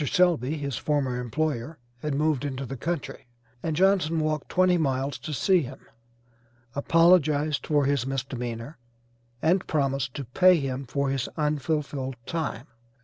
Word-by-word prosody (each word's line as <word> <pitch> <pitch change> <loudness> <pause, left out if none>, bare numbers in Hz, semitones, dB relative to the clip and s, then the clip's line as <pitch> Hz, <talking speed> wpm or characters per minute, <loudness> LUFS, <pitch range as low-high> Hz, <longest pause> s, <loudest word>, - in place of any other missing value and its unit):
Selby, 160 - +2
his 140 -5 -3
former 135 -5 0
employer, 150 +3 -2 0.2
had 150 +2 -2
moved 150 -2 +1
into 135 -1 -3
the 135 - -5
country, 160 -2 -4 0.3
and 160 -2 -2
Johnson 180 -3 +3
walked 155 -1 -1
twenty 185 0 +3
miles 135 -4 -1
to 140 +4 -6
see 180 +5 +3
him, 130 -2 -7 1.0
apologized 155 -1 +3
for 145 -2 +3
his 140 -2 +1
misdemeanor 125 0 -4 0.6
and 180 +4 +2
promised 135 -4 0
to 140 - -4
pay 180 +9 +5
him 135 -1 -3
for 140 +2 -1
his 135 -3 -2
unfulfilled 150 -3 -1
time. 150 -7 -3
145 Hz, 140 wpm, -26 LUFS, 135-160 Hz, 1.0 s, pay